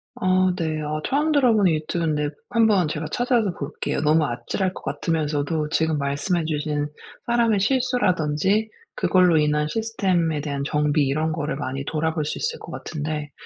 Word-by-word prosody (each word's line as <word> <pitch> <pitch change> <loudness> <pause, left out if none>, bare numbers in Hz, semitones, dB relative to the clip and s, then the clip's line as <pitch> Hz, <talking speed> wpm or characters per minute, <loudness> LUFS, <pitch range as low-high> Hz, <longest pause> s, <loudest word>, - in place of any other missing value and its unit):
아 185 0 +2
네. 160 -3 -2
아 155 +1 -3
처음 300 +3 +1
들어 265 -5 +4
보는 200 -5 +4
유튜브인데 155 -1 -1 0.2
한번 215 -7 +3
제가 155 +1 -3
찾아서 240 -5 +1
볼게요. 140 +2 -3
너무 155 +1 +3
아찔할 185 +9 -2
것 - - -10
같으면서도 150 +1 -1
지금 160 -1 +1
말씀해 145 +5 -1
주신 150 -1 -1 0.4
사람의 235 -3 +2
실수라든지 205 - +1 0.3
그걸로 180 -3 +4
인한 150 0 +2
시스템에 185 -7 0
대한 140 -2 -3
정비 150 0 +2
이런 155 +3 0
거를 155 -2 -2
많이 135 -1 -4
돌아볼 160 0 -1
수 - - -3
있을 470 +1 -2
것 - - -10
같은데 150 -2 -4
160 Hz, 350 characters per minute, -23 LUFS, 150-195 Hz, 0.4 s, 들어